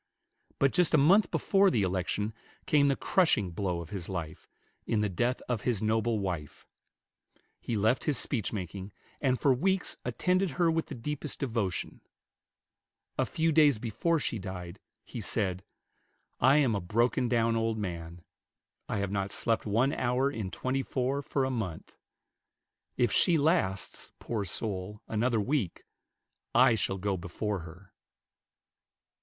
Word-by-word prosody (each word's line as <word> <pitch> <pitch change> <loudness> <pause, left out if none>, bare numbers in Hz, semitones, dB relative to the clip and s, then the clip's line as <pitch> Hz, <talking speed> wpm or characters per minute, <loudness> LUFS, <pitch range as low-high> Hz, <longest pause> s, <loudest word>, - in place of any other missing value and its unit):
But 135 -1 +2
just 180 -3 +4
a - - +6
month 180 +8 +5
before 195 +4 +3
the 110 - +1
election 95 +3 -1 0.3
came 150 -5 +4
the 140 - +3
crushing 130 - +2
blow 90 -1 -2
of 85 - -10
his 95 -5 -4
life, 85 -4 -6 0.4
in 110 -3 +1
the 105 - +1
death 120 +7 -1
of 120 -4 -1
his 120 -5 0
noble 110 +1 +1
wife. 90 -7 -4 0.9
He 115 - -2
left 110 +5 +2
his 150 -4 +1
speech 115 -5 -2
making, 95 0 -6 0.3
and 130 -3 +1
for 140 - +4
weeks 190 +8 0
attended 180 +10 +1
her 170 -2 +4
with 165 0 -1
the 145 - -6
deepest 150 +4 -4
devotion. 115 -9 -2 1.2
A - - +2
few 165 0 +1
days 150 -5 +5
before 120 +10 0
she 120 -6 -2
died, 95 -1 -7 0.3
he 120 - -6
said, 95 -3 -1 0.8
"I 135 +3 +5
am 135 -6 +3
a 100 - -1
broken 115 +6 +1
down 115 -1 +2
old 115 -1 0
man. 85 -4 -5 0.7
I - - -1
have 100 -1 -2
not 100 -1 -2
slept 115 0 -1
one 120 +7 +2
hour 130 +2 +1
in 110 -8 -4
twenty 130 +6 -2
four 135 +1 -1
for 135 -1 -1
a 130 - -1
month. 100 -10 -5 1.0
If 120 - +2
she 170 -2 +4
lasts, 145 - 0
poor 110 -4 -3
soul, 100 +2 -2
another 115 +1 +1
week, 120 - -1 0.7
I - - +6
shall 95 -3 0
go 100 0 -1
before 95 +4 -3
her." 90 +3 -12
115 Hz, 150 wpm, -30 LUFS, 95-135 Hz, 1.2 s, a